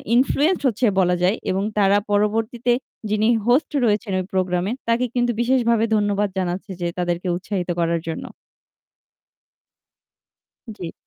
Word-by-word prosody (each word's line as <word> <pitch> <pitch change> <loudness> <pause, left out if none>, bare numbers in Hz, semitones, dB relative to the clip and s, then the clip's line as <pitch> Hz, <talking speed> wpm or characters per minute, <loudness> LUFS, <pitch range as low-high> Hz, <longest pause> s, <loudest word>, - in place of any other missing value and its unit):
influence 290 +7 +2
হচ্ছে 240 +1 0
বলা 180 -1 +3
যায়। 195 +5 +3
এবং 190 +1 0 0.2
তারা 200 0 +4
পরবর্তীতে 225 +4 +1 0.4
যিনি 215 +1 +2 0.2
হোস্ট 255 +6 +3
রয়েছেন 210 -2 0
ওই 185 - -3
প্রোগ্রামে 185 +1 0 0.2
তাকে 235 +2 +2
কিন্তু 245 0 +2
বিশেষভাবে 235 -2 +2
ধন্যবাদ 205 -1 +1
জানাচ্ছে 185 +2 -3
যে 175 - 0
তাদেরকে 175 +1 -1
উৎসাহিত 185 -1 -4
করার 170 -1 +1
জন্য। 160 - -5 2.5
জি। 170 -3 -6
205 Hz, 125 wpm, -22 LUFS, 185-235 Hz, 2.5 s, তারা